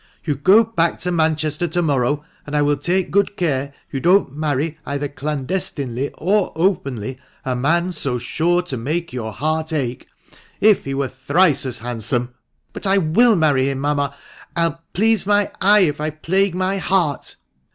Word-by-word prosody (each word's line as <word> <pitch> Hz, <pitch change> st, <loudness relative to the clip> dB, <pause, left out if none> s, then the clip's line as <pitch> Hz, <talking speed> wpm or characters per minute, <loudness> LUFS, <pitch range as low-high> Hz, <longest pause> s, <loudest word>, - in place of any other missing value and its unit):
You 150 Hz, -, 0 dB
go 190 Hz, -, +5 dB
back 170 Hz, -7 st, 0 dB
to 180 Hz, -, -1 dB
Manchester 160 Hz, 0 st, +1 dB
to 175 Hz, +2 st, 0 dB
morrow, 145 Hz, 0 st, 0 dB, 0.2 s
and 145 Hz, -, -4 dB
I 145 Hz, -, +3 dB
will 145 Hz, 0 st, +2 dB
take 175 Hz, +6 st, -1 dB
good 200 Hz, +1 st, +1 dB
care 140 Hz, -5 st, -1 dB, 0.2 s
you 135 Hz, -, -2 dB
don't 175 Hz, -3 st, +3 dB
marry 150 Hz, +1 st, -2 dB
either 145 Hz, 0 st, -3 dB
clandestinely 140 Hz, -2 st, -3 dB
or 195 Hz, +4 st, +1 dB
openly 135 Hz, -, -1 dB, 0.3 s
a 130 Hz, -1 st, -1 dB
man 170 Hz, +8 st, +1 dB
so 135 Hz, -7 st, 0 dB
sure 170 Hz, +8 st, 0 dB
to 160 Hz, -8 st, -5 dB
make 155 Hz, +7 st, -3 dB
your 115 Hz, -3 st, -4 dB
heart 155 Hz, +6 st, -2 dB
ache, 130 Hz, -5 st, -3 dB, 0.5 s
if 210 Hz, -2 st, +4 dB
he 135 Hz, 0 st, -3 dB
were 140 Hz, -1 st, 0 dB
thrice 140 Hz, +3 st, +1 dB
as 125 Hz, -2 st, -2 dB
hand 120 Hz, 0 st, -5 dB
some 120 Hz, +2 st, 0 dB
!" -, -, -51 dB
" -, -, -45 dB
But -, -, -3 dB
I 195 Hz, +1 st, +4 dB
WILL 205 Hz, +7 st, +4 dB
marry 145 Hz, -5 st, +2 dB
him, 135 Hz, -, -2 dB
mamma 145 Hz, 0 st, -1 dB, 0.2 s
— 160 Hz, -, -17 dB
Vll 165 Hz, -1 st, 0 dB
please 215 Hz, 0 st, +2 dB
my 205 Hz, -1 st, +2 dB
eye, 205 Hz, +2 st, +6 dB
if 150 Hz, -6 st, +1 dB
1 155 Hz, 0 st, -2 dB
plague 190 Hz, +1 st, +1 dB
my 185 Hz, +1 st, 0 dB
heart 180 Hz, -7 st, 0 dB
155 Hz, 185 wpm, -20 LUFS, 135-180 Hz, 0.5 s, eye